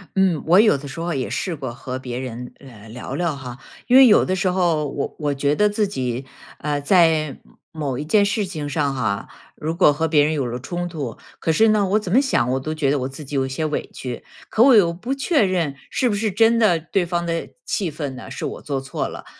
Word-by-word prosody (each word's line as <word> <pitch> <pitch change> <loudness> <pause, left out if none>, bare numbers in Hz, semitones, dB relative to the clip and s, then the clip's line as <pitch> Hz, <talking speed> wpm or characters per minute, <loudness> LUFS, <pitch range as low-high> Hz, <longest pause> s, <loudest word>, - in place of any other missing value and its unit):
嗯， 190 -5 +2
我 175 +4 +6
有 215 -8 +5
的 140 +1 -9
时 140 - -8
候 170 +1 -2
也 130 -3 -2
试 180 -3 -2
过 130 -5 -6
和 130 +1 -6
别 125 -2 -5
人 125 -1 -6
呃， 115 -6 -14
聊 120 +3 -7
聊 170 -4 -1
哈。 125 -3 -8 0.3
因 250 - +4
为 265 0 +9
有 210 - +5
的 185 - 0
时 185 0 +1
候 170 -5 +1
我 140 0 -4
我 145 -2 0
觉 140 +1 0
得 210 +4 +3
自 205 0 0
己， 130 -6 -3 0.3
呃， 145 -1 -2
在 160 -2 +3 0.3
某 145 -6 -3
一 145 - -3
件 200 +7 +3
事 205 +1 0
情 155 -6 -5
上 145 -1 -1
哈， 110 -6 -2 0.3
如 160 +2 -3
果 170 -4 +5
和 160 +3 0
别 150 -2 +4
人 155 +2 +1
有 140 -5 -1
了 120 +1 -4
冲 175 +6 -4
突， 145 -9 -5 0.2
可 160 - 0
是 220 +8 +4
呢， 210 -2 +3
我 205 +3 +2
怎 195 -4 -6
么 240 - +6
想 200 - +1
我 130 - 0
都 155 +4 -4
觉 155 -3 0
得 145 - +2
我 130 - -2
自 135 +3 -9
己 145 +1 -7
有 135 -1 +1
一 - - -5
些 145 +4 -2
委 150 - -2
屈。 125 -2 -6 0.3
可 225 - +4
我 265 -1 +7
又 185 -6 +5
不 210 +10 -4
确 275 0 +2
认 175 -7 0 0.2
是 250 - +1
不 205 - 0
是 215 +1 -1
真 225 +4 +4
的 205 -7 +3
对 175 +3 -1
方 170 0 -2
的 165 0 -2 0.2
气 185 -6 -1
愤 145 -3 -5
呢 125 - -10
是 - - -5
我 - - -5
做 140 -3 -3
错 135 - -3
了。 - - -9
155 Hz, 270 characters per minute, -21 LUFS, 135-190 Hz, 0.3 s, 为